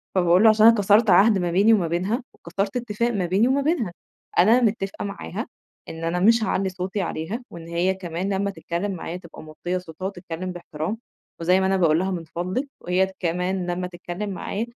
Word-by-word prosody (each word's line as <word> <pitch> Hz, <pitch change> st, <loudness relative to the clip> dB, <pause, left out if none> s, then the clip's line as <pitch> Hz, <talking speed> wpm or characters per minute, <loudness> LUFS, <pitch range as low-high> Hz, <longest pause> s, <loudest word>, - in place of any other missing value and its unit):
فباقول 180 Hz, +2 st, +4 dB
له: 220 Hz, -, +8 dB
"عشان 215 Hz, 0 st, +5 dB
أنا 230 Hz, -, +8 dB
كسرت 205 Hz, +1 st, +4 dB
عهد 200 Hz, +3 st, +6 dB
ما 175 Hz, -2 st, -1 dB
بيني 205 Hz, +5 st, +5 dB
وما 180 Hz, -6 st, +2 dB
بينها 190 Hz, +9 st, -1 dB
وكسرت 195 Hz, +6 st, -3 dB
اتفاق 235 Hz, 0 st, -1 dB
ما 200 Hz, -5 st, -1 dB
بيني 190 Hz, +7 st, +2 dB
وما 270 Hz, +2 st, +2 dB
بينها، 275 Hz, -, 0 dB, 0.5 s
أنا 225 Hz, +7 st, +6 dB
متفقة 210 Hz, -4 st, -1 dB
معاها 80 Hz, -, -5 dB, 0.4 s
إن 165 Hz, 0 st, -7 dB
أنا 170 Hz, +2 st, 0 dB
مش 225 Hz, +4 st, +4 dB
هاعلّي 195 Hz, -3 st, 0 dB
صوتي 185 Hz, +2 st, -3 dB
عليها 180 Hz, +8 st, -4 dB
وإن 165 Hz, -1 st, -10 dB
هي 175 Hz, +3 st, +1 dB
كمان 185 Hz, +1 st, -3 dB
لما 200 Hz, +1 st, 0 dB
تتكلم 190 Hz, +2 st, -3 dB
معايا 180 Hz, -1 st, -5 dB
تبقى 170 Hz, -3 st, -12 dB
موطية 175 Hz, +4 st, -4 dB
صوتها 180 Hz, 0 st, -8 dB
وتتكلم 185 Hz, -2 st, -5 dB
باحترام، 170 Hz, +3 st, -5 dB, 0.4 s
وزي 180 Hz, +3 st, +4 dB
ما 190 Hz, -, +1 dB
أنا 190 Hz, 0 st, +2 dB
باقول 165 Hz, -2 st, +3 dB
لها 190 Hz, +1 st, -1 dB
من 175 Hz, -3 st, -3 dB
فضلِك 185 Hz, -, -3 dB
وهي 185 Hz, +2 st, +1 dB
كمان 180 Hz, +1 st, -1 dB
لمّا 180 Hz, +1 st, -2 dB
تتكلم 175 Hz, +3 st, -6 dB
معايا 200 Hz, +3 st, -3 dB
185 Hz, 195 wpm, -24 LUFS, 175-210 Hz, 0.5 s, له